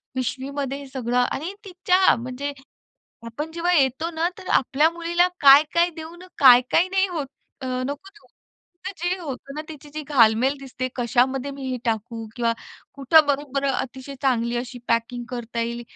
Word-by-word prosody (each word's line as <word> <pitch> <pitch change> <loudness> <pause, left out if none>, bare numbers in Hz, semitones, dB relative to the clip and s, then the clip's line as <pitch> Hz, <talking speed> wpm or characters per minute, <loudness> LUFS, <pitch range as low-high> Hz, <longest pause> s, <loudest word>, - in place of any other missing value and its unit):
पिशवीमध्ये 270 +2 -3
हे 280 - -10
सगळं 250 -2 -2
आणि 310 +9 -1
तिच्या 365 0 +3
म्हणजे 255 +4 -5 0.8
आपण 295 +8 -5
जेव्हा 345 +1 0
येतो 280 +3 +1
ना, 330 +1 0
तर 370 - -10
आपल्या 295 +5 +3
मुलीला 345 +1 +1
काय-काय 300 +5 +6
देऊन 330 +3 -9 0.2
काय-काय 255 +7 +6
नाही 385 +1 +2
होतं, 270 -5 -6
नको 290 +7 -6
देऊ. 420 - -22 0.7
जे 355 +2 -1
होतं 275 -3 -7
ना 305 - -4
तिची 300 0 -8
घालमेल 250 +1 +4
दिसते, 255 -1 -5
कशामध्ये 255 +3 +1
मी 275 0 -9
हे 255 - -2
टाकू 225 0 -3
किंवा 230 -1 +1 0.4
कुठं 285 +3 +5
बरोबर 280 -1 -1
अतिशय 265 +1 -4
चांगली 240 -2 +1
अशी 245 +1 -5
पॅकिंग 235 +1 -1
करता 235 -1 -4
येईल 235 +1 -3
275 Hz, 145 wpm, -23 LUFS, 250-320 Hz, 0.8 s, काय-काय